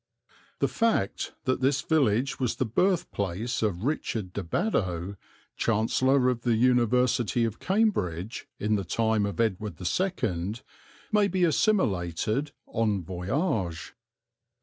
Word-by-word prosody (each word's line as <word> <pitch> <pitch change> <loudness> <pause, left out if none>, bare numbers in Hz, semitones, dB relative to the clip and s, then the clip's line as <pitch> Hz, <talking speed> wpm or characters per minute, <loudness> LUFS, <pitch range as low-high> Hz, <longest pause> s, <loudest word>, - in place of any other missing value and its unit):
The - - +2
fact 225 - 0
that 130 0 0
this 135 +2 +2
village 135 -4 +1
was 125 -3 0
the 130 - 0
birthplace 115 - 0
of 100 -4 -1
Richard 115 -9 -2
de 100 - -2
Badow, 95 - -1 0.4
Chancellor 125 +4 +2
of 125 -2 0
the 120 -1 +2
University 120 -1 +2
of 115 -1 -4
Cambridge, 115 - 0
in 105 0 +1
the 100 - -2
time 110 +2 +1
of 100 - -6
Edward 105 -2 -1
II, 105 - -1 0.6
may 210 -1 +4
be 185 -1 0
assimilated 135 - +1 0.2
en 105 -5 +1
voyage. 90 - -2
115 Hz, 120 wpm, -27 LUFS, 100-135 Hz, 0.6 s, may